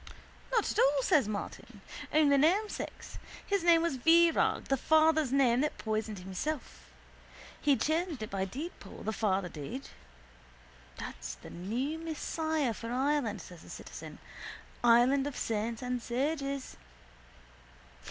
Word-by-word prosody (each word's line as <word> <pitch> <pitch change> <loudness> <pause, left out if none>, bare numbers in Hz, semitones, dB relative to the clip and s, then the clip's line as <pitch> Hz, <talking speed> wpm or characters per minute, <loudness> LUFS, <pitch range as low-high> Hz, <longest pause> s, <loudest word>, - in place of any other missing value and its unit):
—Not 455 -4 +2
at - - -2
all, 275 0 +4
says 270 -6 +3
Martin. 205 -1 -6 0.3
Only 295 -2 +5
namesakes. 365 +10 0 0.3
His 400 -3 0
name 335 -1 +5
was 335 -6 0
Virag, 330 +4 +4
the 270 - +1
father's 315 0 +3
name 260 -3 +4
that 300 - -1
poisoned 215 -1 -2
himself. 190 +12 -5 0.7
He 285 -2 +4
changed 315 -5 -1
it 215 - -7
by 195 -1 -1
deedpoll, 285 - -8
the 220 - -1
father 195 -4 0
did. 170 - -7 1.1
—That's - - -6
the 60 - -12
new 245 - -3
Messiah 315 -4 -1
for 230 +3 -7
Ireland! 255 -6 0
says 175 -3 -12
the - - -14
citizen. - - -9 0.7
Island 245 +4 +5
of 290 - -5
saints 225 +2 -2
and 250 -1 -2
sages! 275 +2 -2
270 Hz, 130 wpm, -31 LUFS, 220-315 Hz, 1.1 s, Only